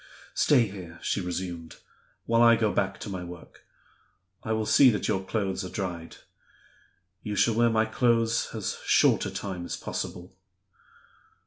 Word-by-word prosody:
"Stay 130 -6 +4
here," 90 -4 -9
she - - -1
resumed, 90 -2 -5 0.5
"while 115 0 +2
I 115 -1 +7
go 110 -2 0
back 95 0 -1
to - - -6
my 95 -3 -5
work. 90 -1 -12 0.8
I 110 - -3
will 110 0 0
see 130 +4 +6
that 105 -4 -1
your 95 -3 0
clothes 95 -1 -2
are 90 - -6
dried. 90 -5 -5 1.1
You 105 -1 -4
shall 115 - +3
wear 120 +1 +3
my 110 -1 +2
clothes 115 0 +1
as - - -4
short - - +3
a - - -3
time 95 -3 -5
as - - -5
possible." 90 +1 -6
100 Hz, 155 wpm, -27 LUFS, 90-115 Hz, 1.1 s, I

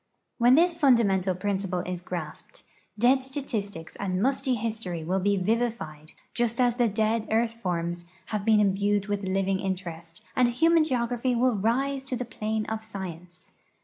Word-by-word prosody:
When 245 +2 +6
this 345 +3 +4
fundamental 220 - +3
})rinciple 190 -2 -2
is 180 -1 -4
grasped, 175 -4 -7 0.3
dead 255 +4 +4
statistics 215 - -5
and 185 -2 -2
musty 260 +2 +1
history 215 -7 -3
will 185 +4 0
he 200 +1 +2
vivified, 190 -7 -2 0.2
just 235 0 -1
as 245 -1 +3
the 240 -2 +3
dead 220 +1 0
earth 225 +1 +1
forms 175 -2 -2 0.3
have 210 -2 -1
been 220 0 +4
im 200 -2 +3
bued 200 0 +1
with 205 -1 -2
living 190 0 0
interest, 175 -4 -5
and 250 - +4
human 325 +6 +4
geography 245 -3 0
will 250 +1 +3
rise 265 +7 0
to 270 - -3
the 250 0 -3 0.2
])lane 215 0 0
of 220 0 -4
science. 180 -5 -8
215 Hz, 160 wpm, -27 LUFS, 185-240 Hz, 0.3 s, When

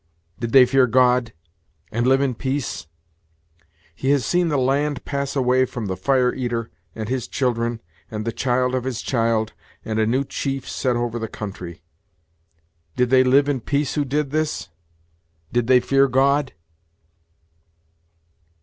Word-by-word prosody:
Did 115 -1 -3
they 130 0 +8
fear 130 0 +3
God, 125 -1 +3 0.6
and 120 +2 0
live 135 +1 +4
in 135 -2 +1
peace? 130 - -3 1.1
He 130 +11 -3
has 140 -4 +2
seen 175 +4 +2
the 150 -3 0
land 140 +2 0
pass 140 0 -3
away 130 -1 +3
from 120 -3 -6
the 95 -2 -2
Fire 130 +2 +2
eater, 120 -3 -3 0.2
and 110 -1 -5
his 125 -1 -2
children, 120 -3 -1 0.3
and 110 -1 -5
the 115 - -1
child 125 +1 0
of 130 -1 -1
his 125 -2 -4
child, 115 -3 0 0.3
and 110 0 -2
a 110 - +2
new 130 +4 +1
chief 135 -1 -4
set 125 -2 -1
over 120 0 -2
the 110 - -3
country. 90 -6 -8 1.1
Did 125 0 +1
they 130 -1 +6
live 135 +3 +4
in 140 -3 0
peace 140 +2 -1
who 150 - 0
did 140 +1 -1
this? 155 -8 -2 0.8
did 120 -1 +1
they 130 0 +6
fear 135 +2 +3
God?" 135 +2 +2
125 Hz, 155 wpm, -22 LUFS, 115-135 Hz, 1.1 s, they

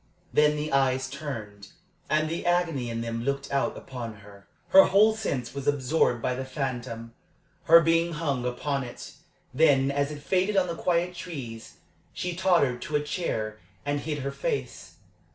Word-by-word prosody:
Then 150 0 +4
the 150 -1 -3
eyes 135 -1 +2
turned, 115 -8 -7 0.4
and 155 0 +2
the 165 +2 -3
agony 170 -8 +1
in 115 0 -3
them 115 0 -3
looked 140 +1 -2
out 140 -1 0
upon 120 -4 -7
her. 100 0 -16 0.2
Her 190 0 +9
whole 215 +3 +5
sense 135 - -3
was 140 -1 -6
absorbed 135 -3 +2
by 125 - +1
the 130 +1 -4
phantom; 125 -4 -4 0.5
her 165 +1 +8
being 165 +1 +2
hung 145 -5 -1
upon 135 +3 -2
it. 120 - -9 0.4
Then, 140 -2 +4
as 140 0 0
it 145 -1 -8
faded 190 +4 +1
on 190 - +4
the 170 - -3
quiet 175 +1 0
trees, 135 -11 -7 0.4
she 180 -1 -3
tottered 170 -9 +2
to 150 - -4
a 150 - +2
chair 110 - -3 0.3
and 145 0 0
hid 150 -2 -4
her 140 - -2
face. 470 - -4
140 Hz, 170 wpm, -27 LUFS, 125-165 Hz, 0.5 s, Her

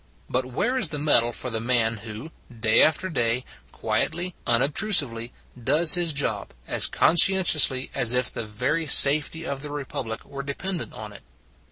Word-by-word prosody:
But 130 +1 -1
where 245 - -1
is 170 - 0
the 150 - -4
medal 140 -5 +3
for 125 +1 -7
the 110 0 -3
man 115 -2 0
who, 110 +8 -9 0.2
day 115 -2 +1
after 160 +4 +2
day, 125 -6 -1 0.3
quietly, 175 +2 -2
unobtrusively, 130 - +2 0.3
does 160 +6 +5
his 175 -2 0
job, 145 -1 -3
as - - +2
conscientiously 165 -6 +3
as 120 - +1
if 125 0 0
the 120 - -5
very 125 +10 -2
safety 150 +4 +2
of 140 -3 -5
the 150 - -8
Republic 135 -5 -6
were 140 0 -7
dependent 165 +6 -5
on 105 -1 -9
it? - - -13
135 Hz, 160 wpm, -24 LUFS, 115-160 Hz, 0.3 s, does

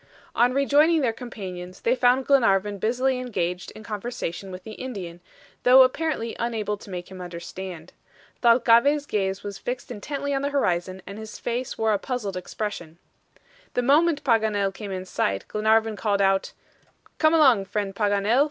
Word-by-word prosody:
On 245 +1 +4
rejoining 290 +4 +3
their 240 -4 +1
companions, 185 -7 -8
they 235 - +2
found 255 +1 +3
Glenarvan 205 -7 +3
busily 250 +5 +1
engaged 180 -8 -3
in 215 - -10
conversation 210 -4 -5
with 185 0 -8
the 220 - -9
Indian, 195 -8 -7 0.4
though 255 +1 +8
apparently 280 -3 -1
unable 220 -3 -1
to 200 - -13
make 180 -1 -7
him 185 -1 -8
understand. 175 0 -8 0.5
Thalcave's 240 +4 +4
gaze 195 -4 -2
was 200 -1 -6
fixed 250 0 -5
intently 280 +5 -4
on 270 - 0
the 285 - -1
horizon, 185 -8 -1
and 200 +3 -8
his 220 -1 -8
face 240 +1 -3
wore 220 -1 +2
a 205 - +1
puzzled 220 -5 -4
expression. 180 -3 -5 0.8
The 245 - +1
moment 300 +4 +3
Paganel 215 -5 +1
came 200 0 -7
in 185 -1 -4
sight, 100 - -1
Glenarvan 220 0 +2
called 200 -1 0
out: 195 -1 +2 0.7
"Come 315 0 +4
along, 260 -11 +5
friend 200 -1 -3
Paganel. 205 +3 +2
220 Hz, 160 wpm, -25 LUFS, 195-255 Hz, 0.8 s, though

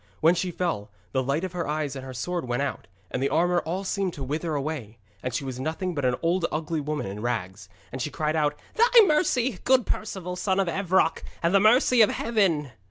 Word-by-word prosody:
When 165 +2 +5
she 180 +1 -1
fell, 165 - -2 0.2
the 130 - +1
light 140 +6 -1
of 185 - -3
her 175 -3 -3
eyes 150 -2 -2
and 135 - -6
her 130 - -7
sword 150 +7 -3
went 120 +3 0
out, 135 -9 -4 0.2
and 130 - -2
the 140 - +1
armour 175 +1 +2
all 180 +5 -3
seemed 190 -2 -1
to 140 - -5
wither 155 +4 -2
away, 140 -7 -4 0.2
and 125 - -3
she 130 - -2
was 130 -1 -5
nothing 160 +6 -2
but 145 -4 -2
an 125 -1 +2
old 170 +1 +2
ugly 155 0 -2
woman 150 +1 -3
in 100 +2 -6
rags. 100 -5 -3 0.2
And 130 - -5
she 150 - -1
cried 150 +2 -1
out: 150 -2 +1 0.2
'Thy 470 +1 +7
mercy, 265 - +1
good 260 -2 +4
Perceval, 180 -4 -4
son 190 0 0
of 195 - +1
Evroc, 185 -1 +1 0.2
and 170 +2 +2
the 195 - +6
mercy 240 +3 +5
of 215 - +6
Heaven!' 185 - +1
160 Hz, 225 wpm, -26 LUFS, 135-185 Hz, 0.2 s, Thy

